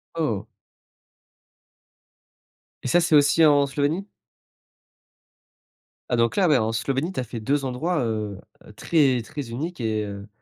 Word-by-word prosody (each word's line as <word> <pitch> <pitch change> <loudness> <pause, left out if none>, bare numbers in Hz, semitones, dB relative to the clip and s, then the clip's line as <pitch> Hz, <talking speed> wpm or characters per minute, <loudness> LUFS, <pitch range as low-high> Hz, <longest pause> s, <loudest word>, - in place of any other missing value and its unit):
Oh! 115 -10 -1 2.4
Et - - -3
ça, 175 - +4
c'est 165 -2 +3
aussi 145 +3 +5
en 145 -2 +5
Slovénie? 145 +7 -1 2.0
Ah 120 - +1
donc 115 0 +2
là, 190 -5 +3
beh 150 - +5
en 110 -1 0
Slovénie, 135 +9 -1
tu - - -3
as - - -3
fait 115 0 -7
2 140 +6 0
endroits, 135 +4 -1
heu, 105 -3 -3 0.4
très 135 +1 +2
très 135 +1 -7
uniques 160 +8 -5
et 110 -2 -1
heu 100 0 -8
135 Hz, 140 wpm, -24 LUFS, 115-155 Hz, 2.4 s, aussi